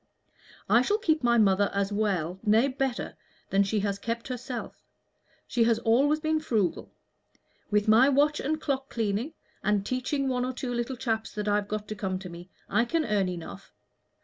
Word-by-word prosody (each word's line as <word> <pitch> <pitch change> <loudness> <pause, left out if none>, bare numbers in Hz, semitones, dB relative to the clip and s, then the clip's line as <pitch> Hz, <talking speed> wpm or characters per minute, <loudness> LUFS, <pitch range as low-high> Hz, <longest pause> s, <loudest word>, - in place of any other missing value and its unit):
"I 235 - +5
shall 410 +11 +1
keep 315 -7 +1
my 235 -1 +3
mother 200 -2 +4
as 200 +1 0
well 190 -4 -1
nay, 220 +4 +4
better 265 -2 -3 0.4
than 195 - +4
she 200 +1 +1
has 200 -1 -2
kept 230 +3 -4
herself. 250 0 -6 0.6
She 235 -2 +1
has 230 -1 +3
always 280 +7 +3
been 315 0 0
frugal. 215 - -1 0.8
With 210 0 +1
my 230 +6 +6
watch 290 +2 +3
and 310 +3 -1
clock 270 -3 -2
cleaning, 225 +6 -2 0.3
and 205 -1 +1
teaching 270 +3 -1
one 250 -1 0
or 255 +1 -2
two 245 0 -4
little 240 +2 -2
chaps 225 -3 -2
that 210 0 -3
I've 205 0 +1
got 210 0 -4
to 215 - -4
come 190 -3 -3
to 185 -1 -8
me, 175 +1 -10 0.2
I 210 +4 +2
can 315 +6 0
earn 205 -5 +1
enough. 175 -2 -8
230 Hz, 180 wpm, -28 LUFS, 205-265 Hz, 0.8 s, my